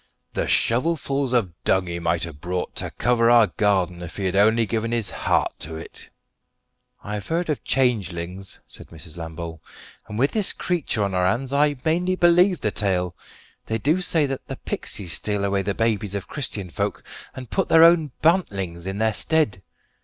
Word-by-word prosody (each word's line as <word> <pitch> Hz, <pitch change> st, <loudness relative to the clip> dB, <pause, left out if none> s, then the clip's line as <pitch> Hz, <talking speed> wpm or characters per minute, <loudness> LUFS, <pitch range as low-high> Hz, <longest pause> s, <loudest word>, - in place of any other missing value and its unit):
The -, -, -1 dB
shovelfuls 140 Hz, +1 st, +1 dB
of 110 Hz, -9 st, +1 dB
dung 95 Hz, -1 st, +2 dB
he 85 Hz, -1 st, -4 dB
might 85 Hz, 0 st, 0 dB
have 80 Hz, -4 st, -6 dB
brought 90 Hz, 0 st, -3 dB
to -, -, -2 dB
cover 120 Hz, -1 st, +2 dB
our 120 Hz, -2 st, +7 dB
garden 95 Hz, -5 st, 0 dB
if 90 Hz, -1 st, -8 dB
he 100 Hz, -, -2 dB
had 95 Hz, 0 st, 0 dB
only 110 Hz, +3 st, +4 dB
given 115 Hz, +1 st, -2 dB
his 115 Hz, -3 st, -1 dB
heart -, -, 0 dB
to 80 Hz, +1 st, -6 dB
it!" 80 Hz, -, -10 dB, 0.9 s
"I've 105 Hz, 0 st, -5 dB
heard 165 Hz, 0 st, 0 dB
of 150 Hz, -, -3 dB
changelings," 95 Hz, -7 st, -1 dB
said -, -, -12 dB
Mrs. 80 Hz, -1 st, -10 dB
Lambole; 80 Hz, -1 st, -7 dB, 0.5 s
"and 105 Hz, -, -6 dB
with 135 Hz, +5 st, +2 dB
this 215 Hz, -3 st, +1 dB
creetur 165 Hz, -, -1 dB
on 100 Hz, -1 st, -1 dB
our 90 Hz, 0 st, +2 dB
hands 125 Hz, +7 st, -1 dB
I 145 Hz, +1 st, +3 dB
mainly 180 Hz, +3 st, +1 dB
believe 175 Hz, +1 st, +4 dB
the 105 Hz, -, 0 dB
tale. 90 Hz, -4 st, -1 dB, 0.5 s
They 110 Hz, -, 0 dB
do 155 Hz, -, +1 dB
say 165 Hz, -4 st, +3 dB
that 135 Hz, -1 st, -5 dB
the -, -, -5 dB
pixies 90 Hz, -6 st, -4 dB
steal 105 Hz, -2 st, -1 dB
away 100 Hz, 0 st, +1 dB
the 100 Hz, 0 st, -2 dB
babies 110 Hz, -3 st, 0 dB
of 100 Hz, -, -4 dB
Christian 105 Hz, -, -4 dB
folk, -, -, -3 dB, 0.3 s
and 130 Hz, -2 st, -9 dB
put 190 Hz, -, 0 dB
their 160 Hz, -, +7 dB
own 165 Hz, -2 st, +6 dB
bantlings 95 Hz, -, +1 dB
in 95 Hz, +1 st, -3 dB
their 110 Hz, 0 st, +1 dB
stead. 150 Hz, -9 st, +1 dB
105 Hz, 185 wpm, -23 LUFS, 90-140 Hz, 0.9 s, our